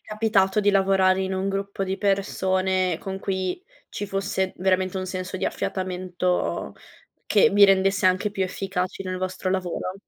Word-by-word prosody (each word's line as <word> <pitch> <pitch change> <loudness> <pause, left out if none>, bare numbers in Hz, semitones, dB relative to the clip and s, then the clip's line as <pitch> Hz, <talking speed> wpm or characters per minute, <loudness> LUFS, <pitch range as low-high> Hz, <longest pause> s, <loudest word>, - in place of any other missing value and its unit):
capitato 215 -2 +2
di 205 0 +3
lavorare 190 -1 +3
in 190 0 -2
un 190 +1 -1
gruppo 195 0 -3
di 190 +1 -2
persone, 190 -3 0
con 190 0 -5
cui 190 - -3 0.3
ci 205 - -5
fosse 190 -1 -2
veramente 185 0 +1
un 185 0 -3
senso 185 0 -4
di - - -3
affiatamento, 180 -1 -2 0.5
che 215 +2 +4
vi 205 0 +7
rendesse 195 -1 +3
anche 185 +3 +2
più 195 -2 -2
efficaci 185 0 -3
nel 185 -1 -4
vostro 185 0 -3
lavoro? 185 0 -2
190 Hz, 155 wpm, -24 LUFS, 185-195 Hz, 0.5 s, vi